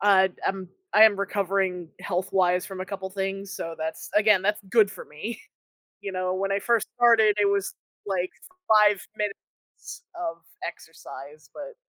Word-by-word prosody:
I've 190 -2 +5 0.2
am 190 -1 -2 0.2
I 215 - +7
am 220 -2 +7
recovering 195 -3 -1
health 185 0 -3
wise 180 -1 +3
from 190 -1 -7
a 185 - -4
couple 190 0 -5
things. 195 0 -4
So, 175 -4 -5
that's 160 0 -5
again, 210 -2 +5
that's 210 +2 +1
good 220 -3 +5
for 205 - -9
me. 210 - -7 0.6
You 200 - -5
know, 185 0 -1
when 195 +1 -1
I 195 - +1
first 230 0 +1
started 230 -3 +5
it 205 - +4
was 200 0 0 0.3
like 185 -2 -1 0.4
5 210 -2 +5 0.2
minutes 210 -2 -7
of 345 -1 -4 0.3
exercise, 145 +3 -11
but 300 +11 -9
195 Hz, 160 wpm, -26 LUFS, 185-210 Hz, 0.6 s, I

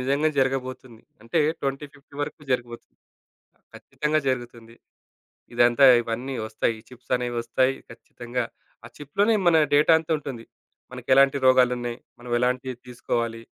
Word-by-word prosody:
నిజంగానే 140 +4 +1
జరగబోతుంది. 130 -3 -3 0.2
అంటే, 115 +8 -1 0.2
2050 140 +1 -6
వరకు 145 - -6
జరగబోతుంది. 120 -2 -4 0.8
ఖచ్చితంగా 150 +1 -2
జరుగుతుంది. 120 -3 -4 0.8
ఇదంతా 120 +3 +4 0.2
ఇవన్నీ 120 +4 -4
ఒస్తాయి. 110 +1 -1
ఈ - - -16
చిప్సనేవి 125 -1 -3
ఒస్తాయి. 130 +3 +1 0.2
ఖచ్చితంగా. 120 +1 -6 0.4
ఆ - - -8
చిప్‌లోనే 200 +10 +1
మన 165 -2 +5 0.2
డేటా 150 +3 +5
అంతా 160 0 -7
ఉంటుంది. 125 -6 -8 0.5
మనకు 125 -1 -10
ఎలాంటి 140 +1 +5
రోగాలున్నాయి, 125 -2 +3 0.2
మనం 120 0 -10
ఎలాంటియి 125 +1 -1
తీసుకోవాలి, 115 -1 -3
125 Hz, 120 wpm, -24 LUFS, 120-135 Hz, 0.8 s, మన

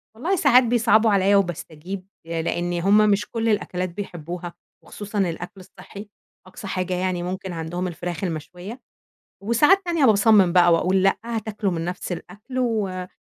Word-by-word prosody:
والله 340 - -1
ساعات 260 -6 +5
بيصعبوا 225 -2 +3
عليَّ 200 0 +3
وباستجيب، 180 0 -3 0.2
لإن 170 +1 -2
همّ 200 +3 +4
مش 205 +1 +1
كل 230 -1 -1
الأكلات 185 -3 -1
بيحبوها، 175 -2 -7 0.3
وخصوصًا 205 0 -6
الأكل 180 +1 -3
الصحِّي، 200 +3 -12 0.4
أقصى 195 +2 -10
حاجة 185 -1 -2
يعني 180 -1 -1
ممكن 185 0 -5
عندهم 170 +3 -4
الفراخ 175 0 -5
المشوية، 180 - -6 0.6
وساعات 295 - +4
تانية 335 -4 +1
باصمِّم 210 -5 +5
بقى 175 -1 +5
وأقول 185 +3 +2
لأ 195 - +3
هتاكلوا 220 -3 -3
من 165 -1 -3
نفس 180 +1 -5
الأكل 220 +8 -8
وما 200 -7 -1
190 Hz, 145 wpm, -23 LUFS, 175-220 Hz, 0.6 s, ساعات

